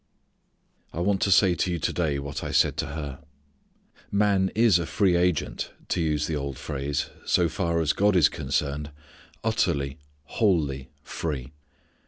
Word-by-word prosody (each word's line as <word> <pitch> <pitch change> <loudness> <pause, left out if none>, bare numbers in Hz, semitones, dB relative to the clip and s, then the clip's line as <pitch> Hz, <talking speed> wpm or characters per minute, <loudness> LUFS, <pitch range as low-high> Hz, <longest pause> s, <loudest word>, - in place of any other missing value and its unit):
I - - -4
want 95 +2 +1
to 100 - +2
say 90 +2 +5
to 90 +1 -1
you 85 - -1
to 80 - -1
day 80 -5 0
what 70 0 -5
I - - -3
said - - +3
to - - -1
her. 70 -2 -6 0.9
Man 100 -2 +2
is 110 -5 +5
a 85 - -3
free 95 -4 +2
agent, 90 -2 0 0.2
to 90 - 0
use 75 -2 0
the 80 - -2
old 70 -2 -4
phrase, 70 0 -3
so 85 - +3
far 85 0 -1
as 80 -2 +2
God 100 0 +3
is 80 -5 +6
concerned; 75 0 -2 0.5
utterly, 80 -10 0 0.2
wholly 75 - 0
free. 70 -5 -4
80 Hz, 160 wpm, -26 LUFS, 70-95 Hz, 0.9 s, is